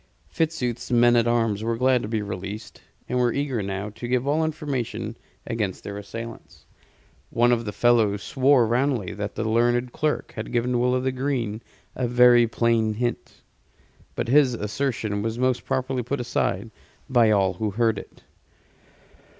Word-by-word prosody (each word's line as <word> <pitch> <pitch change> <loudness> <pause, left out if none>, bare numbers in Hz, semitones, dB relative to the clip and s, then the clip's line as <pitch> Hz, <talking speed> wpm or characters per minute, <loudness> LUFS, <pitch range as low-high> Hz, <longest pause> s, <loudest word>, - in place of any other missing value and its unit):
Fitzooth's 125 -7 -2
men 120 0 +5
at 120 0 +3
arms 115 -3 +1
were 115 0 -1
glad 125 0 +3
to - - -4
be 110 -1 -2
released, 100 +2 -7 0.3
and 125 - -1
were 120 -1 +3
eager 135 -4 -1
now 100 +1 -4
to 120 +3 -7
give 125 +2 0
all 155 +3 +2
information 125 -8 -3 0.3
against 105 -5 -3
their 100 - -6
assailants. 115 +3 -9 0.6
One 120 +1 +3
of 115 -1 +1
the 105 - -3
fellows 110 -3 +2
swore 135 -2 +3
roundly 120 -3 0
that 105 0 -5
the 110 0 -2
learned 120 +2 +2
clerk 150 +3 -2
had - - -5
given 120 0 +1
Will 125 +1 +2
o' 130 - 0
th' 130 - 0
Green 125 -5 -2 0.3
a 125 - -1
very 120 0 +6
plain 115 -1 +1
hint; 120 +2 -4 0.7
but - - -1
this 130 0 +4
assertion 110 -2 -2
was 115 +2 -2
most 130 0 0
properly 130 -1 -1
put 130 +3 -3
aside 115 -3 -1 0.4
by 120 -4 +4
all 100 -3 +3
who 105 +4 -2
heard 110 0 +1
it. - - -14
120 Hz, 165 wpm, -24 LUFS, 110-125 Hz, 0.7 s, very